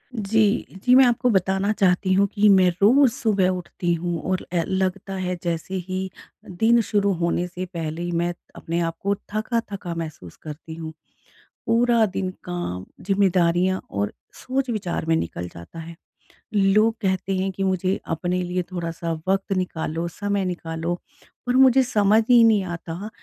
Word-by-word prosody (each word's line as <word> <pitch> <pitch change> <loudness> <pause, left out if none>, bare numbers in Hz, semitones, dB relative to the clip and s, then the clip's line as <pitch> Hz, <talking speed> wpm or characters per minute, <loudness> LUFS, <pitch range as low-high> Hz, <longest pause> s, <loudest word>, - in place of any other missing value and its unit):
जी। 210 -1 +1
जी, 250 0 +5
मैं 265 0 +8
आपको 245 +1 +2
बताना 195 0 +1
चाहती 185 -1 +2
हूँ 200 +1 +4
कि 210 0 +4
मैं 190 -2 +6
रोज़ 255 +5 +6
सुबह 200 -6 +1
उठती 180 -1 -2
हूँ 170 -1 -2
और 185 - -1
ए 170 -2 +2
लगता 190 +1 -1
है 185 -1 -2
जैसे 170 +2 -3
ही 190 0 -3 0.4
दिन 225 +6 +3
शुरू 200 -2 +1
होने 170 +1 +1
से 180 +1 -6
पहले 165 -2 -5
ही 175 0 -3
मैं 175 +1 0 0.2
अपने 165 +1 -3
आप 165 - -10
को 200 +1 +1 0.2
थका-थका 215 -5 -2
महसूस 155 - -7
करती 160 +1 -8
हूँ। 160 -1 -7 0.7
पूरा 235 -1 +3
दिन 185 -1 -3
काम, 175 - -4 0.2
ज़िम्मेदारियाँ 185 -1 +2
और 100 0 -2 0.2
सोच-विचार 240 -11 -3
में 165 - +3
निकल 90 - -3
जाता 85 - -11
है। 165 +1 -8 0.6
लोग 210 +2 +4
कहते 190 -1 0
हैं 190 +1 -1
कि 195 +1 -4
मुझे 190 0 0
अपने 175 +3 -1
लिए 180 +1 -1
थोड़ा-सा 170 -1 -4 0.2
वक़्त 195 +1 0
निकालो, 165 -2 -2
समय 200 +2 -2
निकालो 170 -1 -3 0.5
पर 245 - +1
मुझे 265 0 +6
समझ 215 -2 +3
ही 240 -2 +7
नहीं 220 -3 +4
आता 175 +2 -6
185 Hz, 160 wpm, -23 LUFS, 170-205 Hz, 0.7 s, मैं